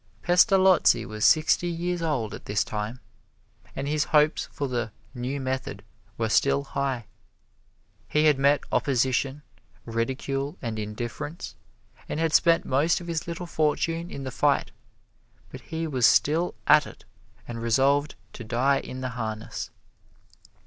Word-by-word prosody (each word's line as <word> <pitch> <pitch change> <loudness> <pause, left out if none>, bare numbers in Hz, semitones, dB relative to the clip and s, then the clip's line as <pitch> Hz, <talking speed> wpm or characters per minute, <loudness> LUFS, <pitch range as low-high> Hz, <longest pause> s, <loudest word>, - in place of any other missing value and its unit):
Pestalozzi 185 0 +4
was 110 0 -2
sixty 160 +2 +4
years 175 +1 -2
old 140 -10 -1
at - - -9
this 105 0 +1
time, 110 +4 -5 0.8
and 135 - -3
his 150 0 +1
hopes 150 -1 +2
for 145 -3 -3
the 120 -3 -2 0.2
"new 130 +2 -3
method" 130 -6 -4 0.3
were 115 - 0
still 140 +5 +2
high. 135 -4 -3 1.0
He 150 +1 +2
had 150 -3 +4
met 140 +1 +3
opposition, 135 +2 0 0.4
ridicule 135 +5 -3
and 115 -3 -4
indifference, 120 +9 -6 0.6
and - - -3
had 165 -1 0
spent 165 -1 +4
most 145 +6 +2
of 175 - -9
his 170 -2 -3
little 170 +1 -5
fortune 165 +1 -1
in 140 - -7
the 130 - -5
fight, - - +1 0.8
but - - -9
he 165 0 -4
was 130 -7 +3
still 160 +4 +2
at - - +5
it - - -14 0.4
and 115 -1 -6
resolved 140 +5 +2 0.2
to 120 - -8
die 125 +5 +1
in 130 - -7
the 130 - -2
harness. 110 -1 -5
140 Hz, 140 wpm, -26 LUFS, 120-155 Hz, 1.0 s, at